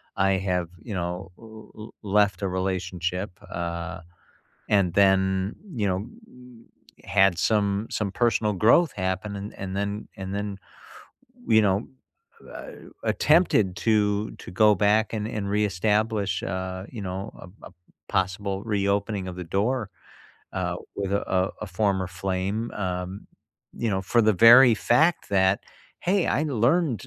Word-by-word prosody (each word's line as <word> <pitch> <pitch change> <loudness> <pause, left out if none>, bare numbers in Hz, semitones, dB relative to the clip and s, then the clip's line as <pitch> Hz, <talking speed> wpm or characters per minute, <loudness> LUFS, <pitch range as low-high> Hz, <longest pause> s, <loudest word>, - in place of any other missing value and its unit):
I 95 0 +2
have, 90 -3 -1
you 105 - -6
know, 90 +1 -4
l 110 -1 -13
l 110 +1 -10
left 100 -1 +2
a - - +1
relationship, 90 0 -2 0.2
uh, 85 0 -4 0.7
and 95 -4 +2
then, 95 0 +2 0.2
you 105 -4 0
know, 95 +3 -1 0.9
h - - -22
had 95 -2 +3
some 100 +2 +1
some 105 -3 -2
personal 115 -2 +1
growth 120 - +4
happen 95 +2 -3
and 100 +1 -7
and 95 0 -5
then 100 +1 -3
and 95 0 -5
then, 100 -1 -4 0.9
you 110 0 +5
know, 100 +1 +1 0.6
a - - -9 0.3
attempted 150 - +3
to 105 +1 +1
to - - -9
go 105 -1 +7
back 105 +3 +2
and 110 -1 -2
and 105 -3 -4
reestablish, 105 0 0
uh, 95 -2 -4
you 115 -4 -7
know, 95 0 -4 0.3
a 90 +4 -14
a - - -18 0.4
possible 95 +1 -1
reopening 100 -2 -1
of 90 - -7
the 90 - -5
door, 110 0 0 0.6
uh, 90 -2 -2 0.2
with, 100 -1 -2
uh, 95 -2 0
a 105 - -4
former 95 0 0
flame, 95 +5 -3
um, 90 0 -4 0.5
you 115 -2 -2
know, 95 - 0
for 115 +5 +2
the 110 0 +4
very 120 +3 +8
fact 155 +10 +2
that, 95 0 +3 0.4
"Hey, 190 +2 +1 0.2
I 150 - +1
learned 135 - +1
100 Hz, 140 wpm, -25 LUFS, 95-110 Hz, 0.9 s, very